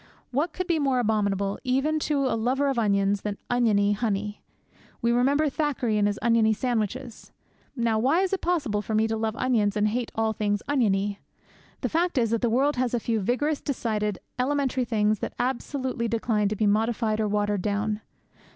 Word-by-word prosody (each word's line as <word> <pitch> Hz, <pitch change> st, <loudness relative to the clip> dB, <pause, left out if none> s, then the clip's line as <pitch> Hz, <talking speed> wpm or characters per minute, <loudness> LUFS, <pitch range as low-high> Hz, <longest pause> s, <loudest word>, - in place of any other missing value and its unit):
What 295 Hz, +7 st, 0 dB
could 370 Hz, +3 st, -3 dB
be 340 Hz, -3 st, +1 dB
more 270 Hz, -3 st, +1 dB
abominable, 200 Hz, -4 st, 0 dB
even 275 Hz, +4 st, +1 dB
to 280 Hz, -2 st, +1 dB
a 260 Hz, -, +1 dB
lover 260 Hz, +5 st, +1 dB
of 265 Hz, -3 st, 0 dB
onions, 200 Hz, -2 st, +2 dB
than 205 Hz, -1 st, -3 dB
oniony 215 Hz, -4 st, +3 dB
honey? 210 Hz, -1 st, -2 dB, 0.6 s
We 235 Hz, -, +1 dB
remember 275 Hz, +6 st, +3 dB
Thackeray 275 Hz, -6 st, -1 dB
and 205 Hz, -, +3 dB
his 205 Hz, 0 st, -1 dB
oniony 230 Hz, -2 st, +4 dB
sandwiches. 235 Hz, +1 st, -3 dB, 0.4 s
Now 230 Hz, -3 st, +1 dB
why 275 Hz, +10 st, +3 dB
is 385 Hz, 0 st, 0 dB
it 390 Hz, -, -1 dB
possible 290 Hz, -13 st, 0 dB
for 215 Hz, +1 st, -3 dB
me 220 Hz, +1 st, +3 dB
to 225 Hz, -, -1 dB
love 220 Hz, 0 st, -2 dB
onions 220 Hz, -6 st, +1 dB
and 210 Hz, -, +2 dB
to 215 Hz, -, 0 dB
hate 245 Hz, -1 st, -2 dB
all 220 Hz, 0 st, +1 dB
things 205 Hz, -1 st, -1 dB
oniony? 205 Hz, -7 st, +1 dB, 0.6 s
The -, -, -1 dB
fact 340 Hz, -1 st, 0 dB
is 230 Hz, -3 st, +2 dB
that 230 Hz, -, +1 dB
the 240 Hz, -, +2 dB
world 270 Hz, +4 st, +2 dB
has 250 Hz, -1 st, 0 dB
a -, -, +1 dB
few 225 Hz, 0 st, -1 dB
vigorous, 275 Hz, +9 st, 0 dB
decided, 215 Hz, -7 st, -2 dB, 0.2 s
elementary 260 Hz, -1 st, 0 dB
things 215 Hz, -2 st, +1 dB
that -, -, -5 dB
absolutely 255 Hz, -1 st, -2 dB
decline 220 Hz, -2 st, 0 dB
to 215 Hz, -, -2 dB
be 215 Hz, -, 0 dB
modified 220 Hz, +1 st, +1 dB
or 215 Hz, -, +1 dB
watered 205 Hz, -1 st, 0 dB
down. 210 Hz, +2 st, -1 dB
230 Hz, 190 wpm, -26 LUFS, 210-260 Hz, 0.6 s, oniony